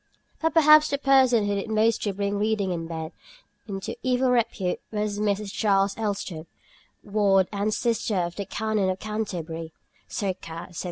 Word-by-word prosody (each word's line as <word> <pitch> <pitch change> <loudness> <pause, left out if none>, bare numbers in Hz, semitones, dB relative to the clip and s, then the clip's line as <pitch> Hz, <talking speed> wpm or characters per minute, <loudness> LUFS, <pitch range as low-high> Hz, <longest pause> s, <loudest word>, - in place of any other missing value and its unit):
But 325 +1 0
perhaps 305 -1 +7
the 280 - 0
person 260 -5 +4
who 205 - 0
did 200 +2 -3
most 220 +1 +2
to 205 - -1
bring 200 +1 -2
reading 210 -3 0
in 165 -2 -3
bed 160 -1 -5 0.6
into 195 -2 -5
evil 255 0 +2
repute 225 -7 0
was 210 -1 -2
Mrs. 205 -1 -1
Charles 195 -2 +2
Elstob, 195 -7 -4 0.6
ward 200 -2 +3
and 205 +1 -1
sister 230 -1 0
of 175 -2 -1
the 200 - -4
Canon 215 -2 0
of 185 - -1
Canterbury 170 -7 -5 0.3
(circa 180 -4 -4
1700). - - -15
205 Hz, 160 wpm, -25 LUFS, 190-220 Hz, 0.6 s, perhaps